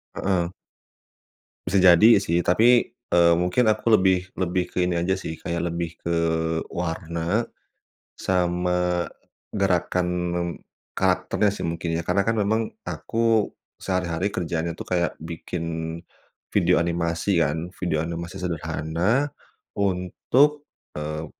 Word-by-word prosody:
Heeh. 90 Hz, -3 st, 0 dB, 1.2 s
Bisa 100 Hz, +2 st, +2 dB
jadi 90 Hz, +3 st, +7 dB, 0.2 s
sih 85 Hz, -1 st, +1 dB
tapi, 115 Hz, +9 st, +4 dB, 0.2 s
eee, 85 Hz, -1 st, +5 dB
mungkin 90 Hz, +7 st, +2 dB
aku 110 Hz, +1 st, +2 dB
lebih 95 Hz, -1 st, +1 dB
lebih 90 Hz, 0 st, +1 dB
ke -, -, -11 dB
ini 90 Hz, -, -1 dB
aja 95 Hz, +2 st, +1 dB
sih 80 Hz, -, -5 dB
kayak 85 Hz, 0 st, -2 dB
lebih 85 Hz, -1 st, -4 dB
ke 85 Hz, 0 st, -2 dB, 0.6 s
warna, 85 Hz, +4 st, -2 dB, 0.7 s
sama, 90 Hz, -1 st, 0 dB, 0.4 s
gerakan 90 Hz, -2 st, +1 dB, 0.9 s
karakternya 105 Hz, -, +1 dB
sih 100 Hz, -, -5 dB
mungkin 85 Hz, 0 st, -2 dB
ya -, -, -2 dB
karena 95 Hz, +2 st, +2 dB
kan 115 Hz, +2 st, 0 dB
memang 110 Hz, +2 st, +2 dB, 0.2 s
aku 115 Hz, -2 st, +1 dB, 0.3 s
sehari-hari 90 Hz, -1 st, -1 dB
kerjaannya 85 Hz, -2 st, -2 dB
itu -, -, -7 dB
kayak 85 Hz, -2 st, 0 dB
bikin 85 Hz, +1 st, -5 dB, 0.9 s
video -, -, +4 dB
animasi 85 Hz, +1 st, 0 dB
kan, 80 Hz, +4 st, -2 dB
video 85 Hz, -4 st, -1 dB
animasi 85 Hz, 0 st, -5 dB
sederhana 90 Hz, -, -1 dB, 0.4 s
untuk, 105 Hz, -, +1 dB, 0.3 s
eee, 75 Hz, +1 st, -4 dB
90 Hz, 115 wpm, -24 LUFS, 85-100 Hz, 1.2 s, jadi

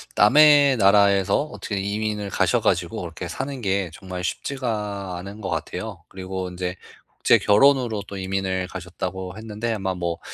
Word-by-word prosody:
남의 145 Hz, +3 st, +6 dB
나라에서 100 Hz, +1 st, +4 dB
어떻게 110 Hz, -9 st, -5 dB
이민을 105 Hz, 0 st, -2 dB
가셔 105 Hz, +5 st, +1 dB
가지고 95 Hz, +1 st, 0 dB
그렇게 85 Hz, 0 st, -6 dB
사는 135 Hz, +6 st, -5 dB
게 95 Hz, -3 st, 0 dB
정말 90 Hz, -1 st, -7 dB
쉽지가 105 Hz, -5 st, -3 dB
않은 100 Hz, +4 st, -8 dB
것 95 Hz, -, -4 dB
같아요. -, -, -5 dB
그리고 95 Hz, -1 st, -5 dB
인제 90 Hz, 0 st, -4 dB, 0.4 s
국제 -, -, +5 dB
결혼으로 115 Hz, -1 st, +3 dB
또 100 Hz, -, -7 dB
이민을 95 Hz, -1 st, -2 dB
가셨다고 95 Hz, +1 st, -6 dB
했는데 110 Hz, +1 st, -3 dB
아마 95 Hz, -3 st, -2 dB
뭐 85 Hz, -1 st, -3 dB
100 Hz, 345 characters per minute, -23 LUFS, 95-110 Hz, 0.4 s, 남의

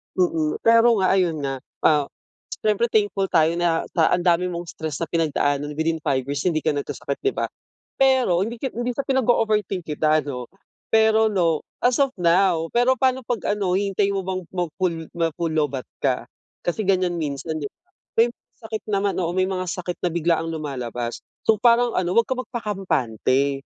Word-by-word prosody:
Mm, 160 Hz, -4 st, 0 dB
pero 230 Hz, +1 st, +5 dB
nga 185 Hz, -, +3 dB
ayun 165 Hz, -5 st, +1 dB
nga, 135 Hz, -1 st, -2 dB, 0.2 s
ah, 150 Hz, -2 st, +4 dB, 0.6 s
siyempre 215 Hz, +2 st, +2 dB
thankful 205 Hz, -2 st, +2 dB
tayo 165 Hz, -1 st, +3 dB
na 170 Hz, -1 st, +1 dB
sa 165 Hz, -3 st, +3 dB
ang 180 Hz, -, +2 dB
dami 175 Hz, 0 st, +3 dB
mong 170 Hz, -1 st, -5 dB
stress 155 Hz, -2 st, -5 dB
na 165 Hz, -, -2 dB
pinagdaanan 145 Hz, -3 st, 0 dB
within 160 Hz, +1 st, 0 dB
5 130 Hz, -1 st, +2 dB
years 145 Hz, +3 st, -3 dB
hindi 160 Hz, -3 st, +1 dB
ka -, -, +2 dB
nagkasakit 140 Hz, 0 st, -4 dB
'di 405 Hz, -, +1 dB
ba. -, -, -2 dB, 0.5 s
Pero 260 Hz, -10 st, +3 dB
hindi 230 Hz, +1 st, -7 dB
ka 265 Hz, -, -1 dB
hindi 240 Hz, +1 st, -2 dB
sa 275 Hz, -, -2 dB
pinag-o-overthink 220 Hz, -7 st, +1 dB
kita, 155 Hz, 0 st, +2 dB
ano. 130 Hz, -4 st, -5 dB, 0.5 s
Pero 220 Hz, 0 st, +5 dB
'no, 165 Hz, -5 st, +1 dB, 0.2 s
as 245 Hz, 0 st, +3 dB
of 275 Hz, -2 st, +2 dB
now, 170 Hz, -1 st, +3 dB
pero 245 Hz, +2 st, +3 dB
pa'no 260 Hz, 0 st, +1 dB
pag 235 Hz, -4 st, -2 dB, 0.2 s
ano 190 Hz, -3 st, 0 dB
hihintayin 200 Hz, +1 st, +1 dB
mo 195 Hz, -, 0 dB
bang 185 Hz, 0 st, -2 dB
mag 175 Hz, -2 st, -1 dB
full 170 Hz, -4 st, -2 dB
ma 165 Hz, -1 st, +2 dB
full 165 Hz, -2 st, -1 dB
low-batt 145 Hz, -4 st, -1 dB
ka. -, -, 0 dB, 0.3 s
Kasi 185 Hz, +5 st, -2 dB
ganiyan 185 Hz, -2 st, +1 dB
minsan 155 Hz, +1 st, -3 dB
'diba, 140 Hz, -, -5 dB, 0.4 s
may 235 Hz, +1 st, +5 dB, 0.3 s
sakit 220 Hz, -1 st, -6 dB
naman 200 Hz, -1 st, 0 dB
oo 175 Hz, -2 st, -1 dB
may 185 Hz, 0 st, +2 dB
mga 185 Hz, -1 st, -2 dB
sakit 175 Hz, +1 st, -4 dB
na 180 Hz, -, +1 dB
biglaang 165 Hz, -1 st, +1 dB
lumalabas. 125 Hz, -6 st, -4 dB, 0.3 s
So 220 Hz, -, +4 dB
parang 235 Hz, +1 st, +4 dB
ano, 180 Hz, -1 st, 0 dB
huwag 230 Hz, -, +5 dB
kang 255 Hz, -1 st, -1 dB
magpakampante. 140 Hz, -, -1 dB
175 Hz, 180 wpm, -23 LUFS, 155-215 Hz, 0.6 s, pero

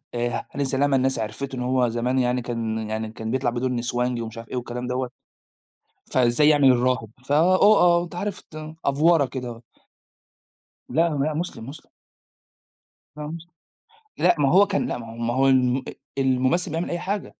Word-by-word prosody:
آآ 120 Hz, 0 st, -2 dB
هاني 140 Hz, 0 st, -2 dB
سلامة 135 Hz, +1 st, +1 dB
الناس 130 Hz, -2 st, 0 dB
عرفته 110 Hz, +5 st, -4 dB
إن 125 Hz, -, -4 dB
هو 125 Hz, -1 st, +1 dB
زمان 125 Hz, +3 st, 0 dB
يعني 125 Hz, 0 st, +1 dB
كان 115 Hz, -2 st, -3 dB
يعني 110 Hz, 0 st, -3 dB
كان 110 Hz, 0 st, -5 dB
بيطلع 130 Hz, -1 st, +1 dB
بدور 125 Hz, +2 st, -2 dB
نسوانجي 120 Hz, 0 st, -1 dB
ومش 110 Hz, 0 st, -7 dB
عارف 115 Hz, -1 st, -9 dB
إيه -, -, -5 dB
والكلام 125 Hz, 0 st, -4 dB
دوّة، 125 Hz, 0 st, -2 dB, 1.0 s
فإزاي 130 Hz, +4 st, +4 dB
يعمل 145 Hz, -3 st, +6 dB
الراهب؟ 120 Hz, -3 st, 0 dB, 0.2 s
ف 145 Hz, -, -2 dB
أ -, -, +5 dB
آه 180 Hz, 0 st, +5 dB
أنت 175 Hz, -, -11 dB
عارف 195 Hz, +2 st, -4 dB
ت 155 Hz, 0 st, -10 dB
أفْوَرَة 145 Hz, +1 st, +3 dB
كده 125 Hz, -1 st, -6 dB
آه. 115 Hz, 0 st, -9 dB, 1.3 s
لا، 165 Hz, +2 st, +2 dB
لا، 150 Hz, 0 st, -1 dB
مسلم، 160 Hz, -8 st, -5 dB
مسلم. 150 Hz, +2 st, -11 dB, 1.3 s
لا 150 Hz, 0 st, -6 dB
مسلم، 165 Hz, +2 st, -8 dB, 0.7 s
لأ 180 Hz, -, +4 dB
ما 140 Hz, -2 st, +3 dB
هو 200 Hz, +3 st, +6 dB
كان 195 Hz, -, 0 dB
لأ -, -, -3 dB
ما 115 Hz, -, -8 dB
هو 115 Hz, -, -10 dB
ما 120 Hz, 0 st, -1 dB
هو 135 Hz, +1 st, +3 dB
الم 130 Hz, -1 st, +3 dB
أ -, -, -6 dB, 0.2 s
الممثّل 135 Hz, +6 st, +1 dB
بيعمل 165 Hz, +2 st, -2 dB
أي 175 Hz, -, -2 dB
حاجة. 200 Hz, +2 st, -3 dB
130 Hz, 185 wpm, -24 LUFS, 120-155 Hz, 1.3 s, يعمل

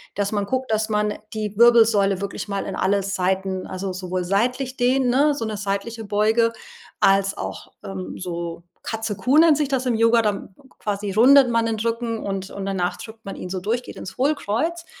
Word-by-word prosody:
dass 200 Hz, 0 st, -1 dB
man 205 Hz, -2 st, -1 dB
guckt, 260 Hz, -1 st, -2 dB
dass 220 Hz, 0 st, 0 dB
man 210 Hz, 0 st, +1 dB, 0.2 s
die 210 Hz, -1 st, -3 dB
Wirbelsäule 220 Hz, -5 st, +5 dB
wirklich 200 Hz, +1 st, -4 dB
mal 200 Hz, -1 st, -3 dB
in -, -, -4 dB
alle 200 Hz, +1 st, +1 dB
Seiten, 190 Hz, -1 st, -1 dB
also, 185 Hz, 0 st, -4 dB
sowohl 185 Hz, 0 st, -3 dB
seitlich 250 Hz, +7 st, 0 dB
dehnen, 255 Hz, +1 st, +2 dB
ne, 285 Hz, +3 st, +3 dB
so 225 Hz, -, -3 dB
'ne 215 Hz, -1 st, -4 dB
seitliche 205 Hz, +3 st, -3 dB
Beuge, 220 Hz, +3 st, +2 dB, 0.5 s
als 195 Hz, 0 st, +3 dB
auch, -, -, -6 dB
ähm, 190 Hz, -1 st, -6 dB
so 170 Hz, -2 st, -5 dB, 0.2 s
„Katze 225 Hz, -1 st, -3 dB
Kuh“ 265 Hz, +5 st, +2 dB
nennt 320 Hz, -2 st, +6 dB
sich 295 Hz, -, 0 dB
das 265 Hz, -1 st, -1 dB
im 240 Hz, -2 st, +1 dB
Yoga, 230 Hz, +1 st, +4 dB
dann 200 Hz, -2 st, -3 dB, 0.2 s
quasi 205 Hz, -1 st, -3 dB
rundet 255 Hz, +5 st, +6 dB
man 230 Hz, 0 st, +2 dB
den 225 Hz, -1 st, -1 dB
Rücken 230 Hz, 0 st, -2 dB
und 195 Hz, -1 st, -4 dB
und 200 Hz, -1 st, -5 dB
danach 185 Hz, -2 st, -1 dB
drückt 220 Hz, 0 st, -11 dB
man 195 Hz, -, -6 dB
ihn 180 Hz, -, -7 dB
so 185 Hz, 0 st, -3 dB
durch, 230 Hz, +6 st, -1 dB
geht -, -, -10 dB
ins 190 Hz, -, -8 dB
Hohlkreuz. 305 Hz, +5 st, -1 dB
215 Hz, 195 wpm, -22 LUFS, 195-240 Hz, 0.5 s, nennt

